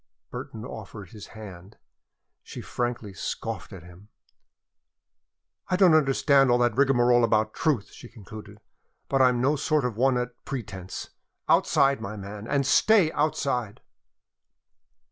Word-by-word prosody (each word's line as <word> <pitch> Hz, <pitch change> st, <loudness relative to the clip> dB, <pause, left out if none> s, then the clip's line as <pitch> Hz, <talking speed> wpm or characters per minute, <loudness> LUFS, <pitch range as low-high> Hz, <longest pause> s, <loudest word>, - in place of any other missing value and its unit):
Burton 110 Hz, +1 st, -7 dB
offered 105 Hz, -4 st, -9 dB
his 105 Hz, -2 st, -11 dB
hand. 100 Hz, -1 st, -11 dB, 0.6 s
She -, -, -10 dB
frankly 120 Hz, -4 st, -4 dB
scoffed 95 Hz, -, -5 dB
at 95 Hz, -4 st, -10 dB
him. 90 Hz, +4 st, -16 dB, 1.6 s
"I 185 Hz, -, 0 dB
don't 180 Hz, -3 st, +5 dB
understand 140 Hz, -2 st, +3 dB
all 120 Hz, -, +4 dB
that 120 Hz, 0 st, +1 dB
rigmarole 125 Hz, -3 st, +3 dB
about 110 Hz, -1 st, +1 dB
truth," 140 Hz, -11 st, -1 dB
she 120 Hz, -, -13 dB
concluded, 105 Hz, -1 st, -12 dB, 0.5 s
"but 135 Hz, -1 st, +2 dB
I'm 125 Hz, -1 st, +4 dB
no 140 Hz, +4 st, +2 dB
sort 150 Hz, -1 st, 0 dB
of 120 Hz, -4 st, -3 dB
a -, -, -8 dB
one 130 Hz, 0 st, +3 dB
at 125 Hz, 0 st, -5 dB
pretense. 100 Hz, -8 st, -7 dB, 0.4 s
Outside, 140 Hz, 0 st, +3 dB
my 105 Hz, +2 st, -6 dB
man, 100 Hz, +2 st, -8 dB
and 140 Hz, +1 st, 0 dB
stay 185 Hz, +4 st, +4 dB
outside!" 135 Hz, -8 st, -1 dB
120 Hz, 135 wpm, -26 LUFS, 105-135 Hz, 1.6 s, don't